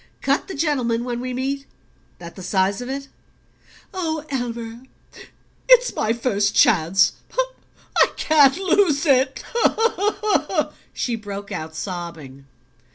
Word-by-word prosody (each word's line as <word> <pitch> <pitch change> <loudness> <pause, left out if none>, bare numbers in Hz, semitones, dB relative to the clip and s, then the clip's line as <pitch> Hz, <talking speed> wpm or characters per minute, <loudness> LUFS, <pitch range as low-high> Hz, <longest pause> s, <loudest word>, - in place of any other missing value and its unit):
Cut 275 +2 0
the 385 - -6
gentleman 255 -6 0
when 240 -1 -3
we 255 +1 -4
meet? 275 +2 -3 0.5
That 170 -1 -10
the 190 - -9
size 190 +3 0
of 245 - -6
it?" 275 +1 -4 0.9
"Oh, 320 -4 -3
Elmer, 235 -2 -4 0.9
it's - - +6
my 220 - 0
first 220 -4 0
chance 185 -1 +4 0.9
I - - +7
can't 290 -2 +4
lose 365 -5 +2
it!" 265 -2 +2 1.5
she 240 - -2
broke 205 -2 -7
out, 160 0 -5
sobbing. 160 -7 -7
245 Hz, 115 wpm, -22 LUFS, 200-280 Hz, 1.5 s, I